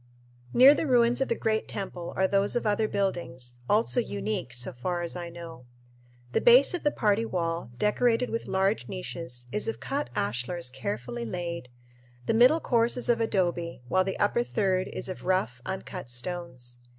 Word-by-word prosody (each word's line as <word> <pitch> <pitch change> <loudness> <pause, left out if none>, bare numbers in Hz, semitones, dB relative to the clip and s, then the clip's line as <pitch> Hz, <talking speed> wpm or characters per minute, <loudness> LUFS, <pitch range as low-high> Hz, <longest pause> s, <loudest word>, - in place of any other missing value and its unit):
Near 265 +3 +8
the 305 - -1
ruins 245 -1 +3
of 270 - +2
the 230 - 0
great 220 0 -1
temple 180 -4 -5
are 190 - +3
those 200 +1 +1
of 240 - 0
other 215 +1 +2
buildings, 130 -12 -1
also 225 +4 +3
unique, 200 - -3
so 120 -1 -2
far 175 +8 -3
as 170 - -4
I 175 -1 -5
know. 165 -7 -10 0.6
The - - +1
base 250 +6 +6
of 355 - -2
the 295 - +3
party 215 -5 +1
wall, 170 - -2
decorated 235 - +2
with 230 - -3
large 195 +3 +1
niches, 165 -9 -6
is 210 - -1
of 225 - -3
cut 285 +2 -3
ashlars 125 - -1
carefully 120 -2 -4
laid; 170 +1 -4 0.6
the - - +1
middle 250 +8 +6
course 235 -4 +2
is 245 - -3
of 235 -1 +3
adobe, 175 - -1
while 185 0 +3
the 190 0 -3
upper 205 +4 +2
third 190 -5 0
is - - -6
of 185 - -7
rough, 180 -10 0
uncut 185 -6 -5
stones. 125 -3 -6
185 Hz, 175 wpm, -28 LUFS, 165-225 Hz, 0.6 s, Near